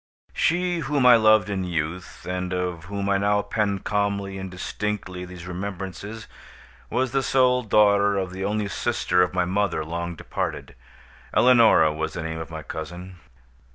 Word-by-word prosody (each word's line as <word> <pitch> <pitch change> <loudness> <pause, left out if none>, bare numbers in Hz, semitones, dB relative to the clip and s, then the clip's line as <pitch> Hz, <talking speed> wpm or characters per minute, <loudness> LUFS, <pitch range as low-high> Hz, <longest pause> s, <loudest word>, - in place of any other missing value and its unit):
She 175 0 +1
whom 145 -3 0
I 125 -1 +9
loved 110 -1 +5
in 100 -2 -2
youth, 85 0 -4
and 90 0 -3
of 90 -3 -3
whom 100 +1 -4
I 100 0 +2
now 105 +1 +2
pen 105 -3 0
calmly 100 -1 -2
and 95 0 -6
distinctly 95 0 -4
these 90 -1 -10
remembrances, 95 +3 -6 0.6
was 130 0 0
the 135 0 +1
sole 125 -1 +3
daughter 100 -2 +3
of 95 -2 -2
the 95 +1 -5
only 105 +1 -1
sister 100 -5 0
of 90 0 +1
my 90 -1 +2
mother 90 -4 0
long 85 +1 -4
departed. - - -4 0.6
Eleonora 115 -10 +6
was 80 0 -3
the 80 - -4
name 80 0 -4
of 80 - -7
my 80 -1 -7
cousin. 85 +4 -7
95 Hz, 160 wpm, -24 LUFS, 90-105 Hz, 0.6 s, I